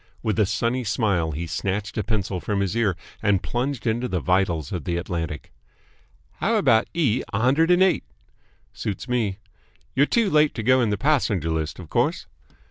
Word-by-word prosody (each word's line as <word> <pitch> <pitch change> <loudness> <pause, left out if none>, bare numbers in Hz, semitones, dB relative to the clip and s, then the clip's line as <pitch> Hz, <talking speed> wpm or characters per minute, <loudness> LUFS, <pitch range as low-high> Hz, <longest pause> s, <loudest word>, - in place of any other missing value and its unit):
With 110 -1 0
a 105 - +4
sunny 115 +5 0
smile 100 -6 0
he 80 +3 -4
snatched 100 +5 -3
a 110 - -1
pencil 100 -3 -2
from 100 +5 -1
his 100 +2 -1
ear 110 -6 +1 0.3
and 100 -3 +2
plunged 130 +1 -2
it 115 - +3
into 120 +3 -2
the 90 - -1
vitals 90 -5 0
of 85 -7 -4
the 85 -1 -1
Atlantic. 85 -3 -4 0.9
"How - - +1
about 110 -1 +3
E. 130 -8 +2
a 100 - -1
hundred 140 +8 +3
and 180 +1 +5
eight?" 190 - +2 0.7
"Suits 105 +4 -4
me." 115 -6 0 0.6
"You're 140 +3 +3
too 225 -5 +2
late 150 -1 +4
to 115 - -3
go 130 +3 +4
in 115 - +2
the 105 - 0
passenger 110 - +1
list, 80 -1 -2
of 90 -4 -10
course." - - 0
105 Hz, 190 wpm, -24 LUFS, 90-125 Hz, 0.9 s, and